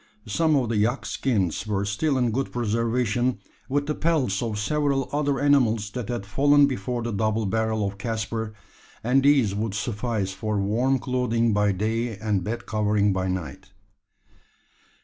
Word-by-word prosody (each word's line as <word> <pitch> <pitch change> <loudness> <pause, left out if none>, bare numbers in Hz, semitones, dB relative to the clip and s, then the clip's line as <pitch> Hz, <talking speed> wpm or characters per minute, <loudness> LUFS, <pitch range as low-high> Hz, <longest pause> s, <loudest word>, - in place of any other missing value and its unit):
Some 155 +8 +2
of 125 -5 +1
the 115 - 0
yak 115 +6 +1
skins 105 - -1
were 100 -1 0
still 130 +8 0
in 125 -2 +1
good 135 +4 -2
preservation 120 +1 0 0.3
with 145 +2 0
the 150 - -1
pelts 145 - 0
of 110 -3 -2
several 140 +4 0
other 145 -1 0
animals 115 -7 +2
that 125 0 -5
had 120 -5 -3
fallen 145 +7 +4
before 125 -2 -2
the 115 - -2
double 110 +1 0
barrel 110 +1 0
of 100 0 -7
Caspar 110 0 -3 0.5
and 125 +4 +3
these 135 -7 +4
would 105 0 -2
suffice 105 -1 -2
for 105 0 -2
warm 120 +7 +1
clothing 120 -3 0
by 105 0 +3
day 110 +3 -1
and 105 -3 -1
bed 115 +5 -4
covering 105 -1 +1
by 95 0 -1
night. 95 +1 -5
115 Hz, 160 wpm, -25 LUFS, 105-130 Hz, 0.5 s, fallen